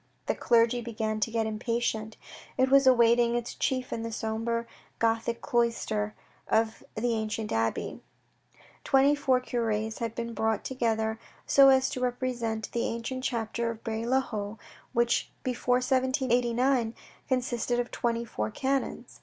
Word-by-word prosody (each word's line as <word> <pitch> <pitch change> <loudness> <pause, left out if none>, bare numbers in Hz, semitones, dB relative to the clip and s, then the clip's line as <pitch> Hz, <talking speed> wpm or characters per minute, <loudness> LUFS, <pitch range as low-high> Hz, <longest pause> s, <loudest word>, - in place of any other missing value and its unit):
The - - +1
clergy 235 0 +3
began 220 -2 -2
to 215 - 0
get 225 -1 0
impatient. 220 0 -2 0.4
It 260 0 +3
was 275 -1 +6
awaiting 235 -1 +5
its 240 -1 -2
chief 255 -1 -1
in 225 - -3
the 230 0 -4
sombre 225 +1 -2 0.3
Gothic 230 +1 0
cloister 230 -3 0 0.3
of 225 0 +1
the 235 +2 0
ancient 220 -1 -2
abbey. 115 0 -1 0.8
Twenty 275 +1 +4
four 270 -3 +2
cures 220 -3 -2
had 230 -1 -3
been 235 0 -4
brought 220 -1 0
together 225 -3 -1 0.3
so 275 -1 +7
as 265 -1 +5
to - - -3
repre 250 +1 -1
sent 225 -3 -3
the 235 - 0
ancient 235 +3 -4
chapter 235 -1 -1
of 225 -1 -7
Bray 225 0 -3
le 260 +3 +2
Haut, 210 -3 -5 0.3
which 235 0 +1
before 250 0 +1
1789 255 -2 +1 0.3
consisted 245 -2 0
of 245 0 -2
twenty 235 0 -1
four 105 - -3
canons. 270 - -2
235 Hz, 145 wpm, -28 LUFS, 225-250 Hz, 0.8 s, so